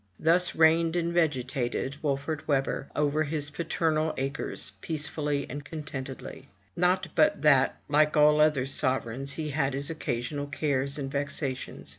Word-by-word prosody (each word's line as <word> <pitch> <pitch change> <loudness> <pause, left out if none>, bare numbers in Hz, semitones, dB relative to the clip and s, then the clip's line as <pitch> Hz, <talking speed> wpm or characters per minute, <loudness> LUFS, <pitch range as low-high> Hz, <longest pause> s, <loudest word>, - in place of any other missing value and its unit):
Thus 175 +3 +4
reigned 165 +1 +4
and 170 -1 0
vegetated 135 -4 -1
Wolfert 145 +1 -2
Webber 135 -1 0
over 150 +1 +1
his 150 -1 -2
paternal 160 0 0
acres, 135 +2 -3
peacefully 150 -2 -2
and 145 +3 -6
contentedly. 140 -4 -7 0.3
Not 180 +2 +1
but 155 -3 +3
that, 135 -3 +4
like 150 +1 +3
all 150 0 +6
other 150 -4 +3
sovereigns, 135 -1 -1
he 155 -1 -4
had 140 -2 0
his 140 +3 -3
occasional 145 -1 -3
cares 140 -1 -1
and 135 -2 -4
vexations. 140 -1 -3
145 Hz, 135 wpm, -28 LUFS, 135-155 Hz, 0.3 s, all